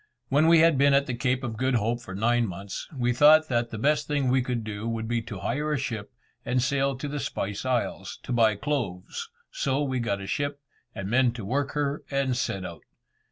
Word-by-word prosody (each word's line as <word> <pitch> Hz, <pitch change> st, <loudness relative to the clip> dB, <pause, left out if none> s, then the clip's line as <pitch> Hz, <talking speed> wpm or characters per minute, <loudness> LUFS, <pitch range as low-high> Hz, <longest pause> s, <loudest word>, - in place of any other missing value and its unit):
When 145 Hz, +4 st, +4 dB
we 165 Hz, -1 st, +7 dB
had 165 Hz, -4 st, +4 dB
been 140 Hz, 0 st, +5 dB
at 140 Hz, 0 st, +3 dB
the 130 Hz, -, -3 dB
Cape 125 Hz, +2 st, 0 dB
of 115 Hz, -3 st, -4 dB
Good 130 Hz, +1 st, +1 dB
Hope 115 Hz, +2 st, 0 dB
for 95 Hz, -5 st, -8 dB
nine 120 Hz, +3 st, +2 dB
months, 95 Hz, +1 st, -6 dB
we 125 Hz, -4 st, 0 dB
thought 155 Hz, +4 st, +6 dB
that 120 Hz, -1 st, 0 dB
the 115 Hz, -, -6 dB
best 145 Hz, +7 st, +1 dB
thing 145 Hz, -3 st, +1 dB
we 130 Hz, 0 st, +3 dB
could 120 Hz, -2 st, -2 dB
do 110 Hz, +1 st, -4 dB
would 115 Hz, -1 st, -3 dB
be 120 Hz, 0 st, 0 dB
to 110 Hz, -4 st, -8 dB
hire 150 Hz, +5 st, -1 dB
a 150 Hz, -, +1 dB
ship, 110 Hz, -7 st, -4 dB, 0.3 s
and 125 Hz, -, 0 dB
sail 135 Hz, +1 st, +1 dB
to 145 Hz, -, -4 dB
the 145 Hz, +1 st, -3 dB
Spice 100 Hz, -3 st, -3 dB
Isles, 125 Hz, -2 st, -2 dB
to -, -, -6 dB
buy 110 Hz, -3 st, +4 dB
cloves, 105 Hz, -7 st, -3 dB, 0.2 s
so 135 Hz, +2 st, 0 dB
we 130 Hz, -2 st, -1 dB
got 100 Hz, -4 st, -1 dB
a 100 Hz, -, -6 dB
ship, 145 Hz, +7 st, -2 dB, 0.4 s
and 95 Hz, -, -4 dB
men 120 Hz, +2 st, +3 dB
to 115 Hz, -5 st, -7 dB
work 140 Hz, +6 st, -1 dB
her, 145 Hz, 0 st, -1 dB
and 135 Hz, -2 st, 0 dB
set 95 Hz, -5 st, -2 dB
out. 85 Hz, -3 st, -8 dB
125 Hz, 225 wpm, -27 LUFS, 110-140 Hz, 0.4 s, we